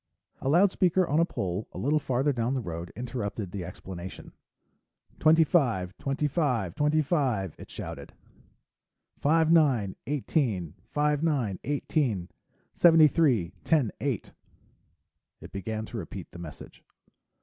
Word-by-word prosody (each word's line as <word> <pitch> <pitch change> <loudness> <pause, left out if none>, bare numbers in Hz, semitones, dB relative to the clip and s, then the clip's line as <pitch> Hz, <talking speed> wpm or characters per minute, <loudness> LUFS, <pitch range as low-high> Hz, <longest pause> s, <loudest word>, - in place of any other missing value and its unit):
A 135 - -2
loudspeaker 180 +1 +3
on 150 +3 +2
a 170 - +5
pole 95 - -3
a - - -8
little 150 +3 +1
farther 135 +1 0
down 120 +2 -1
the - - 0
road 85 -5 -6
interrupted 115 -5 -4
the 95 -2 -4
explanation. 90 +1 -8 0.9
"Twenty 160 +1 +6
five, 115 - +1
twenty 140 +2 -1
five, 130 - 0
twenty 150 +1 +2
five," 130 - 0
it - - -11
shouted. - - -7 1.1
"Five 160 +2 +3
nine, 130 - +3
eighteen. 125 - -1 0.2
Five 150 0 +1
nine, 130 - 0
eighteen. 135 - -1 0.4
Seventy 165 -3 +7
three, 125 - +2
ten 145 -9 +2
eight." 130 -7 -2 1.1
It - - -11
began 110 +3 -4
to 120 - -7
repeat 90 -1 -7
the 85 - -10
message. 80 -4 -10
130 Hz, 130 wpm, -28 LUFS, 95-150 Hz, 1.1 s, Seventy